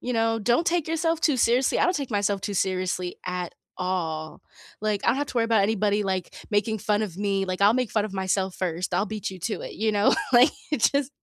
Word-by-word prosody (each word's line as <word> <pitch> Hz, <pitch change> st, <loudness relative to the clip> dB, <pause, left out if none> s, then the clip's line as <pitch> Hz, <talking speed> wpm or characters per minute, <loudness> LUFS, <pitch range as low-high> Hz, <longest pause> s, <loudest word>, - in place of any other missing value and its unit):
You 250 Hz, -, -3 dB
know, 225 Hz, 0 st, +1 dB
don't 240 Hz, +10 st, +1 dB
take 340 Hz, -2 st, +1 dB
yourself 325 Hz, 0 st, 0 dB
too 295 Hz, -6 st, +2 dB
seriously. 245 Hz, +3 st, +3 dB
I -, -, +3 dB
don't 360 Hz, 0 st, +2 dB
take 275 Hz, -4 st, -4 dB
myself 200 Hz, -1 st, 0 dB
too 205 Hz, -, -3 dB
seriously 185 Hz, -1 st, -1 dB
at 180 Hz, -1 st, -4 dB, 0.2 s
all. 165 Hz, -4 st, -3 dB, 0.4 s
Like, 210 Hz, -2 st, 0 dB
I -, -, +2 dB
don't -, -, +3 dB
have 290 Hz, -, -1 dB
to -, -, -8 dB
worry 230 Hz, -, +3 dB
about 225 Hz, -3 st, +3 dB
anybody, 210 Hz, 0 st, +1 dB
like, 190 Hz, -2 st, -3 dB, 0.2 s
making 210 Hz, +1 st, +1 dB
fun 210 Hz, +1 st, 0 dB
of 185 Hz, -5 st, -5 dB
me, 200 Hz, -1 st, 0 dB
like, 185 Hz, +1 st, -2 dB
I'll 205 Hz, +2 st, +6 dB
make 250 Hz, -3 st, 0 dB
fun 215 Hz, -2 st, +1 dB
of 215 Hz, -, -6 dB
myself 190 Hz, 0 st, -1 dB
1st, 180 Hz, 0 st, -2 dB
I'll 200 Hz, +4 st, +1 dB
beat 215 Hz, -3 st, -4 dB
you 185 Hz, -, -9 dB
to 210 Hz, +5 st, -3 dB
it, -, -, -7 dB
you 220 Hz, +1 st, 0 dB
know? 205 Hz, 0 st, +3 dB, 0.2 s
Like, 250 Hz, +4 st, +7 dB, 0.2 s
it 300 Hz, -, +3 dB
just 280 Hz, -2 st, +1 dB
205 Hz, 240 wpm, -25 LUFS, 185-235 Hz, 0.4 s, Like